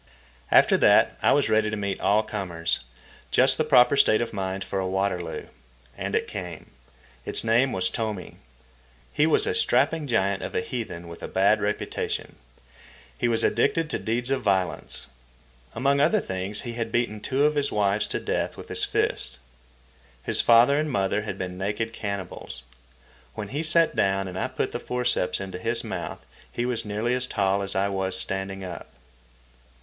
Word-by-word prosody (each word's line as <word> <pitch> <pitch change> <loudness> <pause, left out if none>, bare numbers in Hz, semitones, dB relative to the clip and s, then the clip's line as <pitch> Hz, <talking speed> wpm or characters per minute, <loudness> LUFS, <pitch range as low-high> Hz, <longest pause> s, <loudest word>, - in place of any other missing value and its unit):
After - - +6
that - - +5
I - - +4
was 145 - +3
ready 110 0 +2
to 105 - -2
meet 100 -1 -2
all 105 +2 +3
comers—just 85 - -1
the - - +4
proper 125 +3 +5
state 110 -5 +4
of 120 - -3
mind 95 -1 -3
for 95 +1 -3
a 95 - -1
Waterloo. 95 -2 -2 0.5
And - - -3
it - - 0
came. 90 -5 -7 0.5
Its - - -2
name 120 +4 +3
was 95 -3 +1
Tomi. 105 -1 -4 0.8
He 150 - +3
was 290 - +3
a 440 - 0
strapping 165 - +2
giant 100 -5 +1
of - - -6
a - - +2
heathen 90 -7 -5
with 85 0 -10
a - - -5
bad - - +3
reputation. - - -3 0.8
He 120 - 0
was 115 -1 +2
addicted 165 -1 +1
to - - -1
deeds 120 +3 -2
of 135 - +1
violence. 95 -2 -1 0.7
Among 140 +1 +2
other 165 +9 +4
things 95 - -4
he 120 -2 -6
had 115 -1 -3
beaten 120 -3 0
two 135 +6 0
of 150 - +3
his 145 -1 0
wives 105 0 +1
to - - -2
death - - -2
with - - -10
his - - 0
fists. - - 0 0.9
His - - +3
father 120 +5 +6
and 155 0 -1
mother 100 -4 0
had 110 - -5
been 90 -1 -5
naked 105 +3 -2
cannibals. 100 - -6 0.7
When 105 -2 -5
he 145 +3 -2
sat 165 +1 +2
down 95 0 +1
and 90 0 -5
I - - 0
put 130 0 -2
the - - -4
forceps 125 -8 -1
into 95 -2 -6
his 115 +4 -1
mouth, - - -6 0.3
he 120 - -2
was 120 -2 -1
nearly 105 +4 -1
as 125 0 -1
tall 100 -3 +1
as 100 0 -3
I 95 +1 +2
was 95 -1 -2
standing 95 0 -4
up. 90 -3 -7
105 Hz, 175 wpm, -25 LUFS, 95-125 Hz, 0.9 s, After